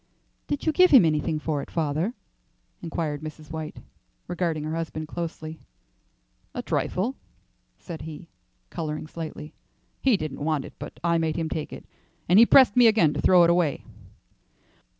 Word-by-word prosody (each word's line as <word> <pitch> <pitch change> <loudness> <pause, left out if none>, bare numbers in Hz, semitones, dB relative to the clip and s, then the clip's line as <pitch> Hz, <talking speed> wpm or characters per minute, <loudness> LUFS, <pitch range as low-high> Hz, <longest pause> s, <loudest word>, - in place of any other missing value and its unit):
"Did 290 - -3
you 315 - +3
give 365 +3 +5
him 250 -11 +8
anything 155 0 0
for 150 -1 -2
it, - - -9
father?" 160 - -1 0.7
inquired 160 -3 -3
Mrs. 155 0 -9
White, 160 -1 -6 0.5
regarding 170 -3 -2
her 155 +1 -3
husband 155 -1 -4
closely. 160 -1 -6 1.0
"A - - -3
trifle," 230 +9 -1 0.6
said 170 -3 -8
he, 160 +2 -9 0.4
colouring 155 -3 -4
slightly. 155 -1 -7 0.5
"He 255 -6 +4
didn't 155 -4 -5
want 155 -3 0
it, - - -11
but - - -9
I 170 -1 +2
made 160 -1 -1
him 165 -1 -2
take 155 -1 -4
it. - - -9 0.4
And 180 +4 +6
he 230 - +8
pressed 260 -6 +6
me 245 -1 +7
again 195 -9 +4
to - - -3
throw 180 -2 +6
it 170 - +5
away." 170 -5 +1
165 Hz, 160 wpm, -25 LUFS, 155-180 Hz, 1.0 s, him